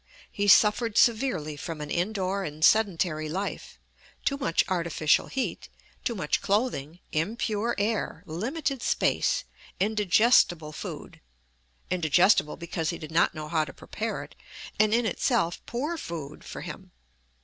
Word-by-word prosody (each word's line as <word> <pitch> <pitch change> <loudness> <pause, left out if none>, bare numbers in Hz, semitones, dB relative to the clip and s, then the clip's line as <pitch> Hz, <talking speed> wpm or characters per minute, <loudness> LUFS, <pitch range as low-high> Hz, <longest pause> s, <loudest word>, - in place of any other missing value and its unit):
He 205 0 -1
suffered 210 +2 +5
severely 215 - +2
from 155 +2 -6
an 150 0 -6
indoor 195 +1 -1
and 155 -1 0
sedentary 170 -7 +2
life, 190 +5 -4 0.5
too 275 - +2
much 215 - +1
artificial 170 -4 +1
heat, 265 - -3 0.3
too 235 - -1
much 150 -7 0
clothing, 195 - -1
impure 215 +6 -1
air, 205 -5 -1
limited 255 - -3
space, - - +1 0.4
indigestible 200 -5 +3
food - - -8 0.7
indigestible 175 0 +3
because 170 -2 -3
he 170 - -3
did 155 -1 -9
not 165 0 +3
know 155 -1 -5
how 160 0 +1
to 150 - -8
prepare - - -4
it, - - -14 0.5
and 215 0 +4
in 235 +1 +2
itself 220 -7 0
poor 295 +8 -3
food 155 -3 -7
for - - -8
him. - - -9
185 Hz, 135 wpm, -27 LUFS, 160-220 Hz, 0.7 s, suffered